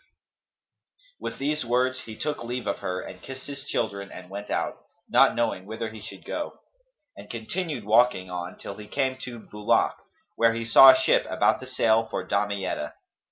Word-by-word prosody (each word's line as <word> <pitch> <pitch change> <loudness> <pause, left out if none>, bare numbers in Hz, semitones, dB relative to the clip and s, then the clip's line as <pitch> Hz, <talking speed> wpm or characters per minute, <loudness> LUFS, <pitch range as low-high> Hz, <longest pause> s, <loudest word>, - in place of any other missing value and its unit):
"[FN#266] - - -36 1.1
With - - -5
these 150 +2 -1
words 125 +2 +1
he 110 - -8
took 150 -4 -3
leave 125 +1 -4
of - - -1
her 90 0 -3
and - - -10
kissed 130 0 -9
his 140 -1 -7
children 100 -7 -2
and 90 0 -10
went 100 +1 -6
out, - - -1 0.3
not - - +5
knowing 115 -5 -1
whither 110 +1 -4
he 110 -1 -10
should 100 -2 -10
go, 300 - -4 0.6
and 100 - -10
he 115 - -4
continued 150 - -3
walking 110 -3 +4
on 90 0 -5
till 100 - -7
he 105 -1 -9
came 130 +3 0
to 120 -2 -7
Bulαk, 105 -1 +1 0.4
where 115 0 +3
he 115 0 -3
saw 135 +4 +10
a 130 0 +8
ship - - +3
about - - +2
to 130 - -9
sail 115 -3 +2
for - - -3
Damietta. 100 -6 -1
115 Hz, 190 wpm, -26 LUFS, 100-130 Hz, 1.1 s, saw